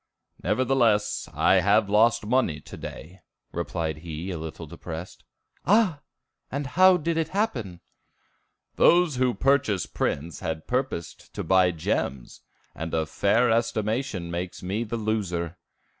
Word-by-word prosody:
"Nevertheless, 120 -5 +1
I 95 - +4
have 100 +3 +3
lost 110 +2 +3
money 110 - +1
to - - -11
day," 90 +4 -9 0.3
replied 85 -2 -3
he, 80 +3 -6
a 85 - -4
little 80 -1 -7
depressed. 80 +3 -8 0.4
"Ah! 190 -4 +3 0.5
and 140 +1 -2
how 185 +7 +5
did 165 0 -1
it 165 -1 +1
happen?" 120 - -2 1.0
"Those 170 -6 +5
who 125 -1 +2
purchased 130 -9 +1
prints 80 +1 -2
had 80 -1 -4
purposed 125 -9 -3
to - - -3
buy 95 -1 +4
gems, 70 -6 -3 0.3
and 80 +1 -4
a 80 -1 +1
fair 115 +8 +2
estimation 110 -4 -1
makes 90 +2 -5
me 100 +5 -1
the 115 +1 -4
loser. 90 -6 -2
105 Hz, 130 wpm, -26 LUFS, 85-130 Hz, 1.0 s, how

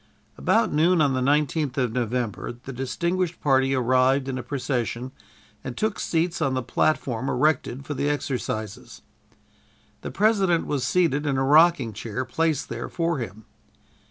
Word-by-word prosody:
About 225 - +1
noon 170 +4 +3
on 145 -3 +3
the 130 - 0
19th 145 0 +1
of 125 -4 +1
November, 120 -2 -2
the 125 +3 -10
distinguished 170 +7 -2
party 135 -1 +2
arrived 130 +2 +2
in 130 -1 -3
a - - -3
procession 125 -1 -3 0.5
and 125 - -6
took 215 -1 -1
seats 170 +1 -1
on 135 -1 +1
the 130 - -1
platform 130 -1 0
erected 135 -1 0
for 145 - -4
the 145 +1 -1
exercises. 120 -7 -4 1.0
The - - -5
President 195 -5 +2
was 140 -4 -2
seated 155 -5 +1
in 135 -2 0
a 135 - +1
rocking 150 -4 +4
chair 115 +5 -4
placed 155 +3 0
there - - -5
for 165 -3 -1
him. 110 -2 -7
135 Hz, 155 wpm, -24 LUFS, 125-160 Hz, 1.0 s, rocking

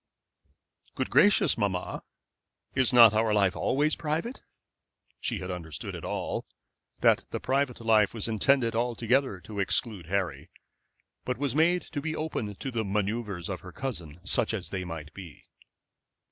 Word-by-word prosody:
"Good - - -2
gracious, 205 - +4
mamma, 95 -4 -2 0.7
is 130 -2 +3
not 115 -4 +8
our 110 0 +2
life 100 -2 +3
always 150 +3 +1
private?" 165 - -3 0.8
She 115 - -2
had 95 -1 -5
understood 85 -4 -5
it - - -7
all, - - -3 0.5
that - - +4
the - - -3
private 135 -1 0
life 110 -3 +4
was 115 -2 -3
intended 115 +1 +2
altogether 120 -1 +1
to 105 +1 -7
exclude 100 -2 0
Harry, 95 0 -2 0.7
but 125 - -2
was 140 0 -1
to 135 - -3 0.4
be 155 +1 -3
made - - -5
open 115 -10 -3
to 135 - -5
the 115 -2 -1
manoeuvres 100 -2 -2
of 95 -2 -4
her 90 - -11
cousin, 85 - -5
such 95 - +2
as 90 -5 -5
they 95 -1 -3
might 80 -4 -7
be. 90 -6 -11
110 Hz, 150 wpm, -28 LUFS, 95-130 Hz, 0.8 s, not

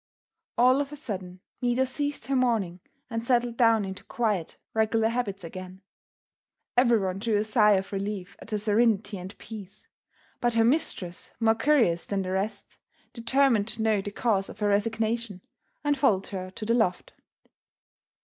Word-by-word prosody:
All 255 +3 +5
of 285 0 -4
a - - -6
sudden 185 -9 -6 0.2
Maida 245 +1 +2
ceased 285 -1 -3
her 270 +2 0
mourning 225 -9 +1 0.3
and 230 -2 -3
settled 240 -1 +1
down 230 -3 +4
into 190 0 -7
quiet, 210 -8 -1 0.2
regular 220 0 +2
habits 215 -5 -2
again. 185 +2 -8 0.9
Everyone 225 -7 +3
drew 220 +1 0
a 205 - +2
sigh 215 -1 +4
of 195 +1 -1
relief 195 -1 -4
at - - -12
her 215 - 0
serenity 210 -1 +1
and 185 +3 -9
peace, 205 -4 -10 0.5
but 240 -1 +1
her 225 0 +4
mistress, 230 - -1
more 225 -1 +4
curious 225 - +2
than 195 -1 -1
the 185 - -4
rest, 195 +3 -3 0.3
determined 235 -2 +2
to 225 0 -1
know 215 -2 +2
the 205 - -5
cause 205 -2 0
of - - -10
her 210 -1 +1
resignation 220 0 0 0.4
and 290 -1 +2
followed 195 -9 +3
her 185 -2 -5
to 215 +3 -7
the 230 - +2
loft. 220 -7 0
220 Hz, 160 wpm, -27 LUFS, 195-240 Hz, 0.9 s, All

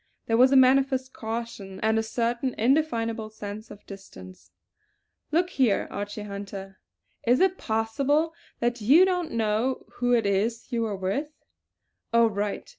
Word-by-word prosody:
There 225 - +1
was 255 +3 +6
a - - +4
manifest 260 0 +4
caution 220 -4 -6
and 220 +1 +2
a - - +2
certain 235 +3 -2
indefinable 230 -4 +1
sense 215 0 -8
of 205 - -13
distance. 95 - -12 0.8
"Look 350 +3 +1
here, 245 - +2
Archie 205 +1 -5
Hunter! 200 -1 -8 0.5
Is 245 +2 +4
it 375 0 +2
possible 275 +9 0 0.3
that 240 0 0
you 290 - +6
don't 360 -3 -1
know 225 +3 0
who 245 0 +2
it 230 -3 +3
is 210 +4 0
that - - -28
you 235 -1 0
were 220 -3 -1
with. 195 +11 -2 0.8
All 230 -1 +4
right! 205 0 -3
230 Hz, 150 wpm, -26 LUFS, 205-260 Hz, 0.8 s, was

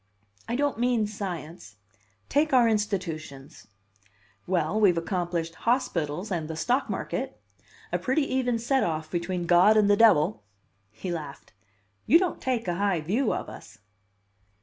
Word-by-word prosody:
"I 235 - -2
don't 285 -2 0
mean 240 -3 +2
science. 175 - -7 0.5
Take 295 +1 +1
our 245 -2 +6
institutions." 170 -10 -3 0.8
"Well, 180 +2 0
we've 190 -5 +4
accomplished 170 -1 -2
hospitals 180 - -1
and 165 -4 -2
the 160 - -5
stock 250 - 0
market - - -4 0.5
a - - 0
pretty 265 +4 +1
even 250 -2 +1
set 260 +4 +1
off 155 -1 -3
between 175 0 -2
God 180 +5 +5
and 205 -1 +4
the - - +6
devil." 155 - +4 0.5
He 110 +12 -6
laughed. 150 -5 -7 0.5
"You 325 - +7
don't 360 0 -2
take 245 -5 -1
a 175 -1 -1
high 195 -4 +1
view 215 - 0
of - - -3
us!" - - -12
190 Hz, 145 wpm, -26 LUFS, 165-235 Hz, 0.8 s, You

